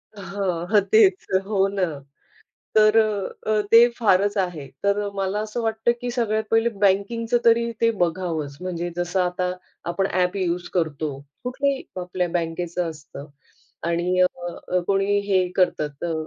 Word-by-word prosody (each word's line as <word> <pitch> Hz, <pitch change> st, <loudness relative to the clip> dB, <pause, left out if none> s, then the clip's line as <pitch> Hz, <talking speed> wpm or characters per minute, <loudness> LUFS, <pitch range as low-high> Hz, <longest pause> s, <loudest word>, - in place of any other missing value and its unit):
हां, 190 Hz, -4 st, -3 dB
हं 210 Hz, -1 st, +6 dB
तेच 200 Hz, -4 st, +5 dB, 0.2 s
हो 195 Hz, -2 st, +2 dB
ना. 195 Hz, -1 st, -2 dB, 0.9 s
तर 215 Hz, +1 st, +6 dB, 0.5 s
अ, 215 Hz, -1 st, +2 dB
ते 235 Hz, +1 st, +9 dB
फारच 205 Hz, -2 st, +2 dB
आहे. 175 Hz, -7 st, -2 dB, 0.2 s
तर 200 Hz, 0 st, +1 dB
मला 195 Hz, +1 st, -1 dB
असं 215 Hz, +2 st, -4 dB
वाटतं 225 Hz, +1 st, +1 dB
की 245 Hz, -, -3 dB
सगळ्यात 220 Hz, -3 st, 0 dB
पहिले 225 Hz, +1 st, +3 dB
बँकिंगचं 210 Hz, +3 st, +1 dB
तरी 235 Hz, 0 st, +4 dB
ते 230 Hz, -, +5 dB
बघावंच. 165 Hz, -5 st, -1 dB
म्हणजे 175 Hz, -1 st, -3 dB
जसं 175 Hz, +2 st, 0 dB
आता 180 Hz, 0 st, -1 dB, 0.4 s
आपण 195 Hz, +2 st, 0 dB
ॲप 180 Hz, +1 st, +1 dB
युज 180 Hz, -1 st, -1 dB
करतो, 155 Hz, -3 st, -1 dB, 0.3 s
कुठल्याही 270 Hz, +2 st, -1 dB, 0.2 s
आपल्या 180 Hz, 0 st, -2 dB
बँकेचं 170 Hz, 0 st, -2 dB
असतं. 145 Hz, -1 st, -10 dB, 0.6 s
आणि 175 Hz, +2 st, 0 dB
अ, 180 Hz, 0 st, -1 dB
कोणी 200 Hz, +1 st, +2 dB
हे 185 Hz, -2 st, +3 dB
करतात 150 Hz, -6 st, 0 dB
अ, 170 Hz, -1 st, -1 dB
190 Hz, 140 wpm, -23 LUFS, 175-215 Hz, 0.9 s, ते